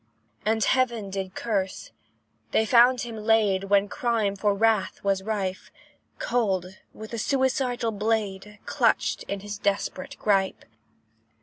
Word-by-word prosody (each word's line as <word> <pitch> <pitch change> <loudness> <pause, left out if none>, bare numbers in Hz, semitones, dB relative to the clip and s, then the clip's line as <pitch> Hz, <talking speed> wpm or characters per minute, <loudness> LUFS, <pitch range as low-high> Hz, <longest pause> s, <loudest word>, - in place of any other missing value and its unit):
And 220 0 +2
heaven 235 -6 +1
did 190 -1 -4
curse 195 -5 -2 0.6
they 220 - +3
found 245 +2 +5
him 230 -2 -6
laid, 210 -3 +2
When 200 0 +3
crime 220 -3 0
for 200 +1 +1
wrath 215 -3 +1
was 195 -1 +1
rife, 195 -3 -3 0.5
Cold 190 -6 -1
with 220 0 -10
the 230 - -4
suicidal 255 -2 0
blade 210 -1 -2
Clutched - - +1
in 200 -1 -4
his 205 0 -6
desperate 200 -2 -2
gripe. 195 -2 0
210 Hz, 125 wpm, -26 LUFS, 195-225 Hz, 0.6 s, found